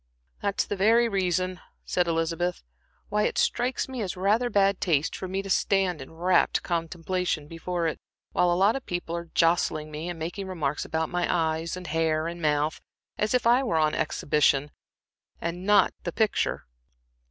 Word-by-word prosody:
"That's 200 -1 0
the - - -3
very 225 +5 +4
reason," 185 -3 0 0.3
said 180 -1 +1
Elizabeth, 165 +2 -1 0.5
"why 210 - +1
it - - -4
strikes 245 +2 +1
me 260 -3 -5
as 190 -2 -3
rather 215 +6 +2
bad 200 -3 +2
taste 155 -3 +1
for 190 - -5
me 190 +1 -2
to 195 - -7
stand 185 -5 +1
in 135 - -10
rapt 175 +3 +2
contemplation 170 -1 -2
before 170 +2 -3
it, 160 - -1 0.3
while 175 - +2
a 175 - +2
lot 200 +4 +4
of 270 - -4
people 175 -1 -3
are 170 -1 -6
jostling 165 -2 +2
me, 155 +3 -5
and 175 - -5
making 175 +5 -5
remarks 150 -6 -2
about 160 0 -1
my 175 -1 0
eyes, 165 0 0
and 180 - -8
hair, 160 0 0
and 170 +1 -5
mouth, 150 0 0 0.4
as 210 +3 +1
if 250 - +1
it 245 +3 +5
were 165 - +1
I 160 - +4
on 155 - -1
exhibition, 145 -2 +1 0.7
and 175 +3 -4
not 210 0 +5
Mr. - - -10
's - - 0
picture." 220 -2 0
175 Hz, 185 wpm, -27 LUFS, 160-195 Hz, 0.7 s, it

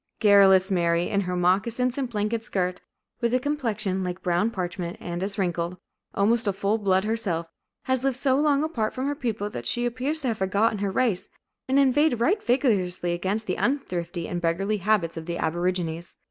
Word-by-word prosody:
Garrulous 195 -2 +6
Mary, 170 -1 +1
in 200 - +2
her 180 -1 -3
moccasins 220 +8 +1
and 270 -3 -2
blanket 215 +1 -2
skirt, 180 -4 -2 0.4
with 235 0 +1
a - - +3
complexion 230 -9 -1
like 180 0 -5
brown 180 +5 +1
parchment 180 -4 -4
and 175 0 -5
as 195 +1 -3
wrinkled, 175 -2 -1 0.4
almost 225 +3 +2
a 200 - +2
full 200 +3 0
blood 190 -2 +2
herself, 195 -7 -2 0.3
has 260 -1 0
lived 270 -2 +1
so 265 -1 +3
long 290 0 +2
apart 235 -9 -2
from 260 +1 -2
her 285 - 0
people 225 -7 -3
that 120 0 -5
she 240 - +2
appears 260 +6 -1
to 260 - 0
have 225 - -3
forgotten 205 +3 +1
her 200 0 -1
race, 200 -2 0 0.4
and 265 - +3
inveighed 280 -1 +3
right 380 - +2
vigorously 190 -9 +1
against 190 +5 -2
the 185 - -2
unthrifty 175 - -2
and 175 - -3
beggarly 195 +5 0
habits 195 -4 0
of 160 0 -7
the 170 0 -3
aborigines. 175 0 -2
200 Hz, 190 wpm, -25 LUFS, 180-240 Hz, 0.4 s, Garrulous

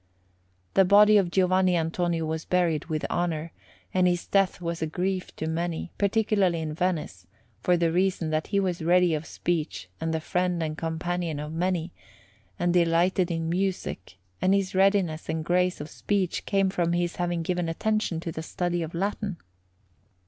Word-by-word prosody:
The 195 - +6
body 210 +3 +6
of 190 -4 +2
Giovanni 185 0 +3
Antonio 165 0 -1
was 160 0 -3
buried 170 -4 +1
with 155 -2 -2
honour, 165 -2 -1 0.4
and 185 -1 +3
his 175 -1 0
death 195 -3 +2
was 170 -1 -4
a 160 - 0
grief 185 +3 -3
to 160 - -4
many, 165 +1 -3
particularly 200 -4 +2
in 155 -1 -3
Venice, 155 - -2 0.3
for 180 +6 +3
the 170 -1 +1
reason 180 -2 +1
that 155 0 -1
he 200 - +1
was 180 -4 -1
ready 175 +1 +4
of 155 +1 -3
speech 155 - -3
and 165 - -2
the 160 - 0
friend 180 +1 -1
and 155 -1 -3
companion 165 0 -3
of 150 +1 -5
many, 175 0 -1 0.7
and 175 0 +1
delighted 175 +1 +3
in 165 -1 -2
music; 175 - -2 0.2
and 190 +1 +4
his 195 -1 -1
readiness 190 -5 +2
and 160 0 -2
grace 180 +1 +1
of 150 - -6
speech 195 0 -2
came 195 -1 +2
from 170 -2 0
his 175 0 -1
having 175 -1 -1
given 175 0 -1
attention 215 0 -1
to 165 - -4
the 160 - -5
study 175 +1 -2
of 165 +1 -5
Latin. 200 +1 -2
175 Hz, 170 wpm, -26 LUFS, 160-185 Hz, 0.7 s, The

